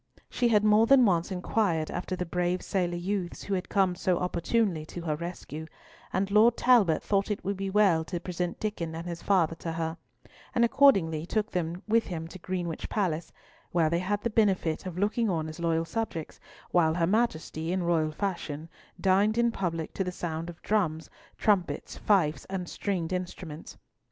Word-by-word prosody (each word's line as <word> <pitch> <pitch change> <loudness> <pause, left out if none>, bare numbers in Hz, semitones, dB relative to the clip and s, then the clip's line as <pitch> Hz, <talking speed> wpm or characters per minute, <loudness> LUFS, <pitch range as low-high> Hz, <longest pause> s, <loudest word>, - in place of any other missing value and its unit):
She 245 - +2
had 210 -3 +4
more 215 +1 +5
than 270 -1 +7
once 175 -4 +2
inquired 180 -3 0
after 185 +1 -3
the 180 - -3
brave 180 +1 -1
sailor 175 -3 -1
youths 185 0 -3
who 200 - -3
had 185 -1 -2
come 190 -3 +2
so 180 0 0
opportunely 180 0 0
to 175 - -7
her 155 -3 -1
rescue; 160 -1 -6 0.4
and 195 +2 -1
Lord 225 +3 +5
Talbot 225 -10 +4
thought 200 0 +1
it 210 - -3
would 200 +1 0
be 195 0 -3
well 190 -5 +4
to 175 +1 -4
present 175 0 -3
Diccon 170 -7 -3
and 165 +1 -6
his 170 -1 -5
father 180 -5 +2
to 165 -1 -4
her, 165 0 -3 0.6
and 235 - +5
accordingly 185 - +4
took 215 +3 -1
them 175 +1 -3
with 225 +1 +2
him 165 -3 -4
to 185 - -10
Greenwich 175 -2 -4
Palace, 175 -6 -1 0.4
where 165 -3 +3
they 170 - +2
had 205 +3 -1
the 235 - 0
benefit 190 -6 +1
of 180 -1 -6
looking 210 +3 +1
on 160 -4 -1
as 155 +2 -8
loyal 165 -1 +1
subjects, 170 -5 -4 0.3
while 160 -2 +3
her 170 -1 +2
Majesty, 170 -5 0
in 185 0 0
royal 165 -2 +1
fashion, 165 -3 -4 0.3
dined 200 +3 +3
in 235 0 +3
public, 165 -6 -3
to 195 - -1
the 180 - -3
sound 165 -1 -4
of 170 - -10
drums, 170 -7 0 0.3
trumpets, 180 -8 0
fifes, 175 -7 +2
and 185 -2 -4
stringed 185 -3 -2
instruments. 175 -3 -6
180 Hz, 185 wpm, -28 LUFS, 165-205 Hz, 0.6 s, than